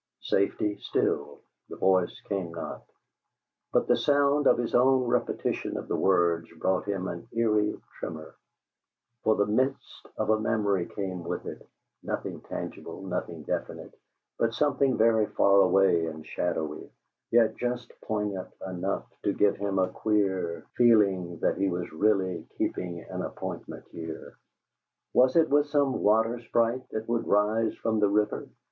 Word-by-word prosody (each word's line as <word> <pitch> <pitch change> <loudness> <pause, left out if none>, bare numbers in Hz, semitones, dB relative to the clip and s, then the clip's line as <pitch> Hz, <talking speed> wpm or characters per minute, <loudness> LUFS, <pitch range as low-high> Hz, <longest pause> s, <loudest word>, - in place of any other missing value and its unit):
'" - - -62
Safety 100 +1 +1
still; - - -1 0.3
the - - -7
voice 95 -2 +1
came 95 -5 -3
not. 85 - -6 0.9
But - - +2
the - - +4
sound 145 0 +3
of - - +5
his 120 -1 -2
own 130 +1 +4
repetition 120 - -1
of - - -6
the - - -1
words 85 -3 +2
brought 95 +3 0
him 95 -2 -2
an 115 - -6
eerie 105 -2 +1 0.2
tremor; 80 -1 -6 0.9
for 110 - +4
the 100 - +2
mist 130 +6 -1
of - - +1
a 110 - +3
memory 100 -5 0
came 95 -3 -5
with - - -4
it; - - -8 0.3
nothing - - -4
tangible, - - -7
nothing - - -4
definite, - - -4 0.5
but 115 -1 +1
something 140 -1 +2
very 110 -1 +4
far 100 0 +4
away 90 -3 +4
and 80 -1 -7
shadowy, 80 -3 -3 0.4
yet 115 -2 +4
just 125 -1 -3
poignant 105 -3 -3 0.2
enough 95 +2 -2 0.2
to 100 - 0
give 105 0 +2
him 100 -1 -2
a 95 -1 +2
queer 95 -6 0
feeling 100 -7 +4
that - - +1
he 100 0 +2
was 90 -1 -3
really 95 -1 +1
keeping 85 -2 -2
an - - -4
appointment - - -6
here. 80 -1 -7 0.8
Was 130 +4 +4
it 160 -2 +4
with 145 +1 +4
some 145 -2 +1
water 110 +3 +3
sprite 115 +2 0
that 110 0 -4
would 115 0 -1
rise 110 +2 +2
from 110 -1 -1
the 105 -1 +3
river? 105 +1 0
105 Hz, 150 wpm, -28 LUFS, 95-115 Hz, 0.9 s, of